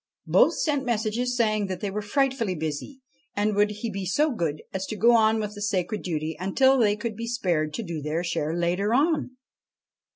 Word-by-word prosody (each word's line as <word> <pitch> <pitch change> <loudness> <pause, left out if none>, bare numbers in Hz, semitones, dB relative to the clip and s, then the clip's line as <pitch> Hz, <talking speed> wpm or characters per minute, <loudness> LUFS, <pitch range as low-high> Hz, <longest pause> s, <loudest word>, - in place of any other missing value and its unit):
Both - - +4
sent 285 -4 0
messages 240 +1 -1
saying 215 -3 +1
that 185 -2 -4
they 200 0 -3
were 210 +2 -3
frightfully 235 -2 0
busy, 160 - -5 0.3
and 210 0 +1
would 205 +1 +3
he 210 +2 -5
be 195 0 -4
so 290 - +1
good 160 -8 -2
as 190 0 -3
to 215 - -4
go 230 +4 +5
on 220 0 +4
with 210 -1 -3
the 205 - -9
sacred 205 0 -1
duty 160 -2 -3
until 265 +9 +3
they 210 -3 +3
could 215 +1 -4
be 230 +2 -5
spared 175 -11 0
to 230 - -3
do 170 -5 -5
their 155 +4 -2
share 165 -2 -2
later 180 +6 +1
on. 290 -3 +1
210 Hz, 200 wpm, -25 LUFS, 180-235 Hz, 0.3 s, go